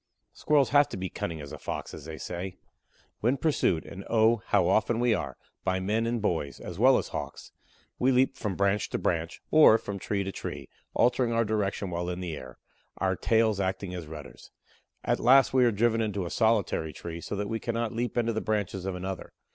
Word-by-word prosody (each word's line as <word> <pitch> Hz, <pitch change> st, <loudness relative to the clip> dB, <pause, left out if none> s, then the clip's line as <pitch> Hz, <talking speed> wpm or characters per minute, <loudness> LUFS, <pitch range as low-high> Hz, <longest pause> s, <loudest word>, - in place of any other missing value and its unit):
Squirrels 145 Hz, -3 st, +2 dB
have 145 Hz, +1 st, +5 dB
to -, -, -6 dB
be 95 Hz, -2 st, -4 dB
"cunning 80 Hz, -2 st, -4 dB
as 70 Hz, -, -9 dB
a -, -, -8 dB
Fox," -, -, -5 dB
as -, -, -9 dB
they 80 Hz, -1 st, -7 dB
say. 90 Hz, +3 st, -5 dB, 0.6 s
When 125 Hz, +5 st, +1 dB
pursued 130 Hz, -, +1 dB
and 95 Hz, -, -8 dB
oh, 115 Hz, 0 st, +4 dB
how -, -, +3 dB
often 110 Hz, +2 st, +2 dB
we 120 Hz, -1 st, +3 dB
are, 70 Hz, -, -3 dB, 0.3 s
by 95 Hz, 0 st, 0 dB
men 110 Hz, +5 st, 0 dB
and 120 Hz, 0 st, 0 dB
boys, 80 Hz, -9 st, -2 dB
as 90 Hz, +1 st, -8 dB
well 130 Hz, +3 st, +6 dB
as -, -, -3 dB
Hawks -, -, -6 dB, 0.5 s
we 130 Hz, +2 st, +3 dB
leap 130 Hz, +1 st, +3 dB
from 105 Hz, -4 st, -3 dB
branch 100 Hz, +1 st, +1 dB
to -, -, -2 dB
branch, 85 Hz, -1 st, -2 dB
or 155 Hz, -8 st, +8 dB
from 100 Hz, -3 st, -6 dB
tree 100 Hz, +1 st, -1 dB
to 95 Hz, -, -4 dB
tree, -, -, -6 dB, 0.3 s
altering 125 Hz, 0 st, +3 dB
our 115 Hz, 0 st, +2 dB
direction 100 Hz, -3 st, -1 dB
while 85 Hz, +1 st, -2 dB
in 90 Hz, 0 st, -4 dB
the 85 Hz, -4 st, -4 dB
air, 65 Hz, -3 st, -10 dB, 0.4 s
our 95 Hz, -1 st, +1 dB
tails 110 Hz, 0 st, +2 dB
acting 95 Hz, -1 st, -2 dB
as 85 Hz, -4 st, -6 dB
rudders. 75 Hz, -2 st, -10 dB, 0.5 s
At -, -, +1 dB
last 130 Hz, +3 st, +5 dB
we 130 Hz, -1 st, +5 dB
are 120 Hz, -, +4 dB
driven 115 Hz, +2 st, +2 dB
into 100 Hz, -4 st, -2 dB
a 85 Hz, -, -5 dB
solitary 105 Hz, -8 st, +1 dB
tree, 85 Hz, 0 st, -7 dB
so -, -, -4 dB
that 100 Hz, 0 st, -2 dB
we 115 Hz, +2 st, -2 dB
cannot 115 Hz, 0 st, -2 dB
leap 120 Hz, +2 st, -2 dB
into 115 Hz, -1 st, +1 dB
the 110 Hz, -, -1 dB
branches 100 Hz, -4 st, -2 dB
of 95 Hz, -, -2 dB
another. 95 Hz, 0 st, -6 dB
105 Hz, 210 wpm, -28 LUFS, 90-115 Hz, 0.6 s, or